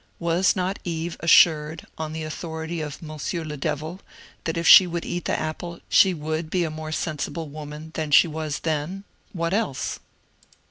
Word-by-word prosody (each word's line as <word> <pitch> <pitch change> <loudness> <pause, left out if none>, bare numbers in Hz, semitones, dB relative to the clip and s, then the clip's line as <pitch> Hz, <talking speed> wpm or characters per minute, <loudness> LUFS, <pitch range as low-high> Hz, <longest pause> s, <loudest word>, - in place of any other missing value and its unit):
Was 170 +2 +2
not 185 +2 -1
Eve 165 -1 -3
as 165 - -1
sured, 155 -1 +5
on 155 -1 -4
the 160 0 -4
authority 160 +1 -5
of 150 +1 -6
Monsieur 155 +2 -4
le 150 -1 -5
Devil, 155 +4 -3 0.5
that 165 0 -2
if 170 - 0
she 185 - +10
would 170 -1 -4
eat 175 -1 -4
the - - 0
apple 170 +2 -5
she 190 - +6
would 155 0 -3
be 180 +1 +1
a 160 - -2
more 155 0 -6
sensible 155 +1 -3
woman 150 +1 -8
than 155 -2 -3
she 150 - +7
was 155 -2 -4
then 160 +5 -2 0.2
— - - -37
what 170 -1 -2
else 205 - -1
160 Hz, 185 wpm, -24 LUFS, 155-170 Hz, 0.5 s, she